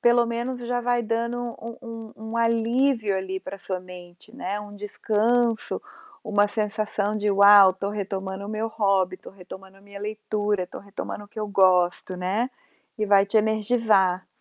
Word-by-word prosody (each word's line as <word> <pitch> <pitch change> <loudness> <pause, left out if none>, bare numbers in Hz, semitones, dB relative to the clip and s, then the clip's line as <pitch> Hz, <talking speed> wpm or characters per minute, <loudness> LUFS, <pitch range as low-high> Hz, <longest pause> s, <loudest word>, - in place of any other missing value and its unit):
pelo 240 0 +4
menos 240 +2 -3
já 245 0 0
vai 245 0 +1
dando 230 +2 -1 0.2
um 230 +1 -7
um 230 -2 -8 0.2
um 230 - -3
alívio 230 -1 +2
ali 190 0 -4
para 200 - -8
sua 190 -1 -4
mente, 180 +4 -13
né, 205 -5 -4
um 205 0 -10
descanso, 220 +3 0 0.4
uma 205 -1 +3
sensação 210 -1 -1
de: 210 0 0
"Uau, 200 -1 +8
estou 195 +2 -4
retomando 195 -1 -4
o - - -8
meu 215 +1 -2
hobby, 195 -4 +1
estou - - -13
retomando 190 0 -12
a - - -22
minha 200 0 -12
leitura, 210 -1 -2
estou 180 - -10
retomando 200 +1 -7
o 205 - -18
que 215 - -8
eu 210 - -2
gosto", 185 -2 +3
né, 195 +7 -1 0.5
e 215 - +1
vai 200 0 +5
te 200 - 0
energizar. 215 -4 +2
210 Hz, 170 wpm, -25 LUFS, 195-230 Hz, 0.5 s, Uau